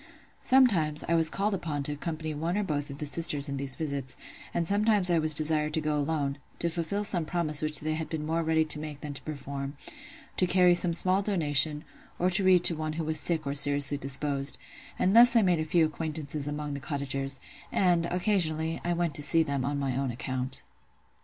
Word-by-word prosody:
Sometimes, 190 - +3
I 170 - 0
was 165 -1 +5
called 200 +4 -1
upon 155 -6 -4
to 150 - +1
accompany 155 +1 -5
one 165 +5 -3
or 210 - 0
both 145 -5 -3
of 140 - -8
the 150 - -5
sisters 145 -1 +3
in 140 -1 -4
these 135 -1 +1
visits; 140 -4 -4 0.3
and 170 - -2
sometimes 205 -2 +1
I 170 - +2
was 155 -1 +3
desired 155 0 +2
to - - 0
go 150 -1 -2
alone, 145 -1 -2 0.2
to 170 - -2
fulfil 175 +5 -3
some 180 -5 -1
promise 155 -2 0
which 155 -2 +1
they 155 +1 -2
had 160 0 -5
been 155 -2 -4
more 165 +2 -1
ready 160 -1 +1
to 155 -1 -1
make 150 -2 -8
than 150 -1 -6
to 140 - -10
perform; 140 -1 -7 0.6
to 185 - +3
carry 180 -1 +4
some 175 -1 +4
small 185 +3 +2
donation, 155 -6 +3 0.3
or 180 - +1
read 185 -2 +3
to 170 - +5
one 155 0 -4
who 165 +1 -4
was 155 0 0
sick 160 -1 0
or 140 - -3
seriously 145 0 +4
disposed: 140 0 0 0.4
and 190 +3 +1
thus 240 +1 +8
I 230 - +5
made 180 -3 +1
a - - -1
few 165 +1 +2
acquaintances 155 -2 -4
among 150 0 -5
the 140 - -5
cottagers; 135 -1 -3 0.3
and, 175 -3 +1
occasionally, 165 -4 -1
I 175 - -1
went 170 -2 -2
to - - -5
see 160 +3 +3
them 140 -4 -3
on 140 +3 -2
my 135 -3 -2
own 135 0 -2
account. 130 +2 -3
155 Hz, 210 wpm, -27 LUFS, 145-170 Hz, 0.6 s, thus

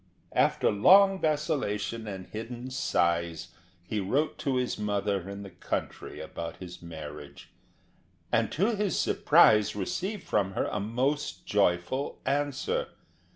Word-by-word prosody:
After - - +3
long 195 - +6
vacillation 135 -8 -1
and 95 -2 -6
hidden 120 +3 -7
sighs 85 - 0 0.3
he 105 +4 -3
wrote 135 +11 0
to 135 -2 0
his 125 -3 -1
mother 100 -2 -1
in 100 0 -6
the 100 - -10
country - - -5
about 85 0 -6
his 90 -2 -9
marriage, 75 -3 -9 0.8
and - - +2
to 210 +8 +1
his 205 -2 0
surprise 105 -1 +4
received 190 - -3
from 95 -2 0
her - - 0
a 105 - -1
most 130 +8 -1
joyful 100 +7 0
answer. 145 - 0
105 Hz, 125 wpm, -28 LUFS, 95-145 Hz, 0.8 s, long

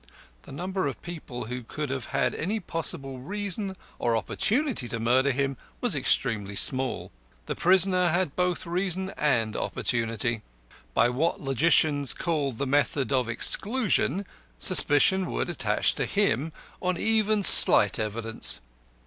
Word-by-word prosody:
The - - -15
number 185 +4 -4
of 140 - -6
people 155 -8 -8
who 125 +2 -6
could 145 +4 -6
have 130 -4 -4
had - - -1
any 205 +8 -3
possible 160 -7 -5
reason 200 - -5 0.2
or 115 -1 0
opportunity 230 - -2
to 115 0 -5
murder 125 +4 +1
him 135 0 -2 0.2
was 245 -6 0
extremely 115 -7 -1
small. 130 +4 +1 0.3
The - - -4
prisoner 185 0 +3
had 175 -3 -1
both 180 -1 -1
reason 185 +2 -3
and 115 -7 -1
opportunity. 115 -1 -2 0.5
By 120 - +3
what 150 +7 -2
logicians 145 0 +1
called 145 -8 -3
the 140 - -3
method 140 0 -1
of 125 -3 0
exclusion, 200 - +1 0.3
suspicion 180 - +5
would - - -3
attach - - 0
to - - -3
him 165 - -1 0.3
on 185 -1 -2
even 215 -1 +1
slight - - +8
evidence. 110 +1 0
145 Hz, 135 wpm, -25 LUFS, 125-185 Hz, 0.5 s, slight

